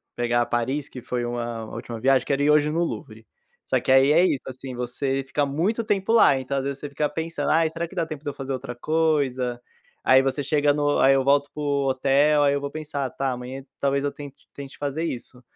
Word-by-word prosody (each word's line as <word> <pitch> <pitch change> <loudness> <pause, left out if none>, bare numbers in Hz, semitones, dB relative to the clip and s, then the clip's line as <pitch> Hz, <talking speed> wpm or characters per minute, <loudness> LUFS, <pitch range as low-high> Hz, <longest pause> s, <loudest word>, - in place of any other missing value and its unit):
pegar 120 0 +1
Paris, 130 +5 -1
que 125 - -9
foi 120 0 -3
uma 120 -1 -4
uma - - -10
última 115 -1 -6
viagem. 130 +1 +3
Quero 140 0 0
ir 145 - +3
hoje 150 0 +4
no 165 +2 +1
Louvre. 110 -9 -6 0.4
Só - - +1
que - - -1
aí 135 +2 +6
é 170 +4 +5
isso, 140 -7 0
assim, 130 0 -7
você 135 +3 -2
fica 145 +2 0
muito 170 +12 0
tempo 205 -1 0
lá, 220 -12 +6
então 130 +1 -3
às 135 - -1
vezes 140 0 -4
você 145 - -6
fica 150 +1 -1
pensando: 160 -2 -2
"Ah, 165 +1 +4
será 165 +1 -4
que 190 - -14
dá 170 -3 0
tempo 155 -3 -8
de 145 - -3
eu - - -5
fazer 135 0 -5
outra 130 -1 -5
coisa?" 135 -5 0 0.4
Aí 130 0 +6
você 135 +2 -1
chega 145 0 +2
no 145 0 +1
aí 135 - +6
eu 135 -1 +2
volto 140 +1 +3
para 150 - -6
o 140 -2 0
hotel, 140 +3 +3
aí 140 -1 +3
eu - - 0
vou 140 0 -4
pensar, 150 -3 -4
tá 135 -1 -2
amanhã 125 +2 -6 0.2
talvez 140 0 +1
eu 145 - 0
tente 140 -1 -12
tente 140 -1 -10
fazer 145 +2 -3
isso. 125 -4 -6
140 Hz, 240 wpm, -24 LUFS, 130-150 Hz, 0.4 s, aí